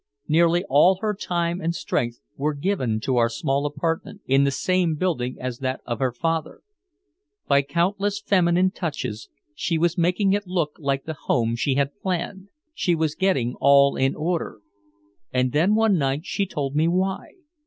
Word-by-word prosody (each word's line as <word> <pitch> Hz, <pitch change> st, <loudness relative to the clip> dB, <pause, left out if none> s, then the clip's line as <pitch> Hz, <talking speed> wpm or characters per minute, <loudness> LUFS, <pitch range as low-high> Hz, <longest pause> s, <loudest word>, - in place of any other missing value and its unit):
Nearly 170 Hz, +2 st, +3 dB
all 150 Hz, +8 st, +5 dB
her 215 Hz, -1 st, 0 dB
time 175 Hz, -2 st, -2 dB
and 170 Hz, 0 st, -1 dB
strength 120 Hz, -6 st, -2 dB
were 150 Hz, +2 st, -1 dB
given 140 Hz, -, -1 dB
to 130 Hz, +1 st, 0 dB
our 115 Hz, -1 st, +3 dB
small 135 Hz, +5 st, -1 dB
apartment, 165 Hz, +3 st, -3 dB
in 135 Hz, +1 st, +3 dB
the -, -, +3 dB
same 175 Hz, +3 st, +1 dB
building 145 Hz, -7 st, -1 dB
as 125 Hz, -1 st, -5 dB
that 130 Hz, 0 st, -2 dB
of 120 Hz, -1 st, -3 dB
her 130 Hz, -2 st, +1 dB
father. 160 Hz, +5 st, -2 dB, 0.9 s
By 140 Hz, 0 st, +4 dB
countless 190 Hz, +8 st, -1 dB
feminine 185 Hz, -2 st, +2 dB
touches 145 Hz, -, -5 dB, 0.2 s
she 165 Hz, +2 st, -1 dB
was 170 Hz, +1 st, +1 dB
making 180 Hz, +3 st, +2 dB
it 205 Hz, -1 st, -1 dB
look 170 Hz, -5 st, -1 dB
like 140 Hz, -2 st, -1 dB
the 160 Hz, -, -5 dB
home 115 Hz, -5 st, 0 dB
she 130 Hz, +3 st, 0 dB
had 140 Hz, 0 st, -1 dB
planned. 190 Hz, +1 st, -3 dB, 0.3 s
She 180 Hz, -, +1 dB
was 160 Hz, -2 st, 0 dB
getting 145 Hz, -11 st, 0 dB
all 140 Hz, 0 st, +5 dB
in 135 Hz, +1 st, +1 dB
order. 160 Hz, -8 st, -3 dB, 0.7 s
And 125 Hz, 0 st, +1 dB
then 170 Hz, +9 st, +3 dB
one 220 Hz, -5 st, +3 dB
night 140 Hz, +3 st, -1 dB
she 200 Hz, -1 st, -1 dB
told 140 Hz, -5 st, -3 dB
me 155 Hz, +2 st, +3 dB
why. 185 Hz, +2 st, -1 dB
160 Hz, 170 wpm, -23 LUFS, 135-180 Hz, 0.9 s, all